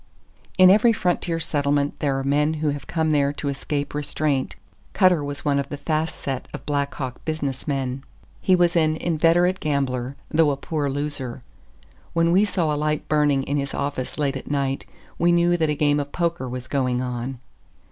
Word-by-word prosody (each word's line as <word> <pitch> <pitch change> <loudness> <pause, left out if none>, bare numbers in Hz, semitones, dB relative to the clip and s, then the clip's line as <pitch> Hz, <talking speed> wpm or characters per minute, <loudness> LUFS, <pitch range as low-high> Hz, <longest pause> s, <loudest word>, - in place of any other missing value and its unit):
In 185 -1 +8
every 220 +4 +5
frontier 175 -4 0
settlement 145 -2 0
there 140 -2 0
are 135 - -2
men 150 +3 +2
who 155 -1 0
have 145 0 -4
come 160 -2 0
there 140 -2 +3
to 145 0 -3
escape 140 +1 -3
restraint. 145 -2 -1 0.4
Cutter 180 -6 +4
was 145 0 -5
one 140 -1 +2
of 140 - -3
the 145 - -5
"fast 155 +2 -1
set" 135 -2 -4
of - - -9
Black 140 -1 -1
Hawk 130 -3 -5
business 145 -4 -3
men. 135 -2 -2 0.4
He 185 - +4
was 175 -1 +3
an 155 -2 +3
inveterate 170 +3 +2
gambler, 135 -3 -1
though 155 -1 +3
a 140 - -1
poor 145 0 -2
loser. 135 -3 -4 0.7
When 165 0 +3
we 190 +4 +5
saw 175 -6 0
a - - -1
light 150 0 -1
burning 145 -3 +2
in 140 +2 -1
his 140 -1 -3
office 140 -2 -3
late 140 -2 0
at 135 - -7
night, 140 -2 -1 0.3
we 175 +1 +4
knew 175 0 +3
that 160 -3 +1
a 150 - +1
game 145 0 +2
of 145 0 -4
poker 170 -7 -1
was 125 0 -6
going 125 -3 0
on. 125 +1 -4
145 Hz, 190 wpm, -23 LUFS, 140-160 Hz, 0.7 s, In